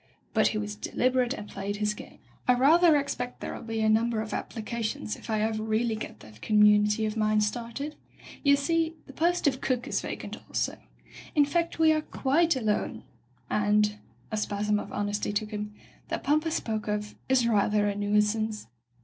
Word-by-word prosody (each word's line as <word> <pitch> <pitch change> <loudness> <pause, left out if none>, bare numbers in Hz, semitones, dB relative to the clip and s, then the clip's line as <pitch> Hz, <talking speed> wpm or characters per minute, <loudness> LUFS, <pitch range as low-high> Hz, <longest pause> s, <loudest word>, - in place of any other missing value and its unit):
But - - +4
he - - -1
was 105 0 -3
deliber 255 - +1
ate 245 +1 -2
and 210 - -8
played 200 +1 -4
his 210 0 0
game. - - -11 0.3
"I 250 - +6
ratfier 310 +4 +6
expect 250 -3 -4
there'll - - -5
be 225 -1 -3
a 220 - +3
number 225 +1 +2
of 215 0 -4
applications 215 - -3
if - - -13
I 215 -1 +1
ever 220 0 0
really 220 +1 0
get 215 - -7
that 110 0 -15
commu 210 -1 +5
nity 210 +1 +1
of 215 0 -2
mine 215 -1 +2
started. 235 +7 -2 0.5
You 280 -1 +6
see 325 +3 0
— - - -30
the 275 - -12
post 345 +5 +1
of 265 -3 +2
cook 250 -2 -1
is - - 0
vacant - - -6
also. - - -2 0.6
In 295 -2 +6
fact, 335 +3 -1
we 320 -1 +5
are 310 - +1
quite 305 +3 +2
alone 215 -5 -1 0.3
— 125 0 -36
and," 210 0 +2 0.3
a 215 - -1
spasm 210 0 0
of - - -7
honesty 205 0 -1
took 210 +1 -2
him, 210 0 -4 0.4
"that - - -3
pump 305 +3 +2
I - - +1
spoke 220 -9 -2
of 210 0 -2 0.2
is 260 -2 +4
rather 210 -1 +3
a 205 - 0
nuisance. 210 +1 +1
220 Hz, 195 wpm, -28 LUFS, 210-265 Hz, 0.6 s, I